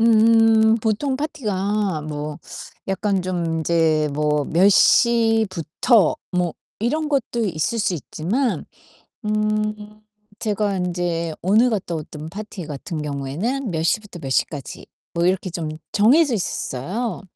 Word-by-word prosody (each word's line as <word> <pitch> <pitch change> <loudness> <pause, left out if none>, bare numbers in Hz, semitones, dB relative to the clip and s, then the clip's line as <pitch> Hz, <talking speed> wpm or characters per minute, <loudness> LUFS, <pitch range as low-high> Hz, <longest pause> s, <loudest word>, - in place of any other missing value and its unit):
음. 225 0 +5
보통 250 +5 0
파티가 210 - -1
뭐 150 0 -5 0.5
약간 195 -1 0
좀 180 -2 -2
인제 160 -2 +2
뭐 150 0 +1
'몇 180 +5 +4
시부터.' 225 - +3 0.2
뭐 180 -2 0 0.2
이런 300 +8 0
것도 245 -5 0
있을 175 +5 -1
수 190 -4 +1
있지만 205 - -2 0.6
음 215 0 -1 0.4
제가 205 -2 0
인제 175 -2 -2
오늘 220 +7 +4
갔다왔던 160 -6 -4
파티 200 -2 -7
같은 150 +2 -5
경우에는 150 - -3
'몇 160 -1 -1
시부터 200 0 -1
몇 135 - -6
시까지.' 140 +1 -2 0.3
뭐 170 0 +1
이렇게 185 0 +1
좀 165 -2 -4 0.2
정해져 260 +6 +4
있었어요. 190 - -3
195 Hz, 230 characters per minute, -22 LUFS, 165-225 Hz, 0.6 s, 음